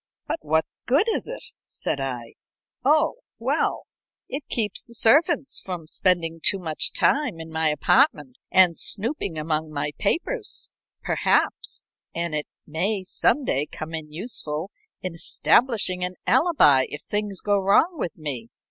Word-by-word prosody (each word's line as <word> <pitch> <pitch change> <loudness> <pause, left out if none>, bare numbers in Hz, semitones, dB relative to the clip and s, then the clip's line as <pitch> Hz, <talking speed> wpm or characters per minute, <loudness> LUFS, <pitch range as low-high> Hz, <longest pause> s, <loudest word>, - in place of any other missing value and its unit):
"But 330 - -2
what 160 +1 +1 0.2
good 290 - +3
is 445 - 0
it?" - - -7 0.2
said 140 - -3
I. 125 -4 -4 0.5
"Oh, 310 - +3 0.2
well - - 0 0.4
it 275 - -3
keeps 215 -5 0
the 235 - -14
servants 270 +5 +3
from 180 -4 -5
spending 165 -1 +1
too 195 - +5
much 160 -4 +1
time 275 - +1
in 160 0 -8
my 160 0 +1
apartment, 255 - +2 0.4
snooping 215 - -1
among 155 0 -1
my 145 0 -2
papers, 415 - -1 0.3
perhaps; - - 0 0.2
and 170 -1 -2
it 150 -1 -2 0.2
my 190 +6 -1
some 280 +8 +1
day 145 - 0
come 160 +1 -8
in 155 -2 -6
useful 160 -2 -4 0.3
in 185 -2 -3
establishing 185 +1 +2
an 180 0 -2
alibi 245 - +4
if 145 - -7
things 205 -2 -3
go 205 -1 +2
wrong 275 - +3
with 170 - -3
me. 135 -7 -6
185 Hz, 140 wpm, -24 LUFS, 155-250 Hz, 0.5 s, too